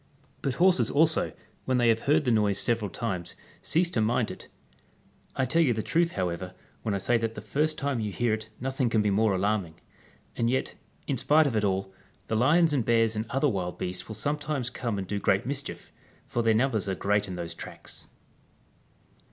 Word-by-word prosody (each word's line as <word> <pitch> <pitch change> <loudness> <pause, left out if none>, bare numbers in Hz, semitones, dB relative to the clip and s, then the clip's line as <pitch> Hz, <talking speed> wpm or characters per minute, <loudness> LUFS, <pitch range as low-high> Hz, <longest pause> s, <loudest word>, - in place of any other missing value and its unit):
But 135 -3 -1
horses 180 +4 +4
also, 160 +2 +3 0.3
when 130 -1 +1
they 120 -1 +4
have 115 0 +3
heard 155 +1 +4
the 125 - +2
noise 105 -3 +2
several 110 -1 +1
times, 95 -8 -4 0.3
cease 170 +2 +1
to 115 - +1
mind 115 +1 +1
it. - - -10 0.9
I 130 - +1
tell 165 +7 +2
you 135 -7 +3
the 110 -1 -3
truth, 170 0 +1
however, 90 0 -3 0.3
when 105 -3 -1
I - - +1
say 115 +5 +2
that 115 0 -2
the - - -5
first 150 +9 -1
time 140 -3 -1
you 105 -2 -2
hear 120 +2 0
it 110 0 -4
nothing 130 -1 -1
can 110 -2 +2
be 105 - +2
more 105 0 +2
alarming. 95 -4 -1 0.6
And 115 0 +1
yet, 130 +2 -1 0.3
in 140 - -1
spite 155 +5 +4
of 135 -5 0
all, 95 -1 -1 0.4
the 110 - 0
lions 150 +7 +4
and 135 -5 +1
bears 115 -1 +2
and 110 +1 -3
other 135 +2 +1
wild 90 -7 -2
beasts 90 0 -4
will 110 - -6
sometimes 145 -3 -1
come 115 -4 -3
and 95 - -3
do 100 +2 -3
great 95 +2 +1
mischief; 140 +2 -4 0.3
for 120 - -1
their 115 -1 +3
num 130 +5 +2
bers 105 -3 -1
are 95 - -1
great 105 +2 +1
in 95 - -5
those 85 -1 -5
tracts. - - -9
115 Hz, 205 wpm, -27 LUFS, 100-135 Hz, 0.9 s, horses